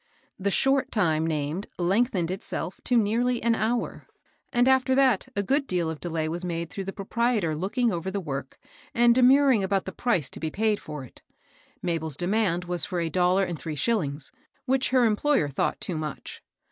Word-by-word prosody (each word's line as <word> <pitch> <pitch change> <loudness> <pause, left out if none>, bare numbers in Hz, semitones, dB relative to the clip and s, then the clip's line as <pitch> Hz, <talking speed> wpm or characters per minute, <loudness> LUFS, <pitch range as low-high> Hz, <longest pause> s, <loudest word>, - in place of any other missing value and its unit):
The 200 +1 0
short 270 +6 +2
time 160 -6 +1
named 155 +4 -2
lengthened 185 -1 +1
itself 190 -1 -5
to 245 - +3
nearly 235 +3 +1
an 235 0 +3
hour; 225 +2 -2 0.4
and, 245 +1 +3
after 260 0 +4
that, 260 -7 +3
a 200 - 0
good 275 +6 +1
deal 175 -3 0
of 160 - -7
delay 165 -2 -2
was 170 +3 -2
made 170 -2 -3
through 195 - -5
the 195 - -3
proprietor 210 -4 0
looking 220 +8 0
over 175 0 -3
the 200 +1 -2
work, 140 -6 -5 0.4
and 240 0 +5
demurring 260 -2 +5
about 190 0 0
the 190 - -5
price 190 - 0
to - - -8
be 160 - -2
paid 215 +4 0
for 150 -3 -7
it. 130 - -14 0.6
Mabel's 160 -4 -2
demand 180 -2 0
was 175 -1 -2
for 180 -3 -2
a 165 -1 -1
dollar 185 +1 +3
and 170 -4 -4
three 160 -2 -5
shillings, 145 - -1 0.4
whidi 260 0 +2
her 255 -1 +4
employer 225 - +2
thought 140 - -1
too 170 -4 -3
much. 150 -2 -6
190 Hz, 185 wpm, -26 LUFS, 165-235 Hz, 0.6 s, and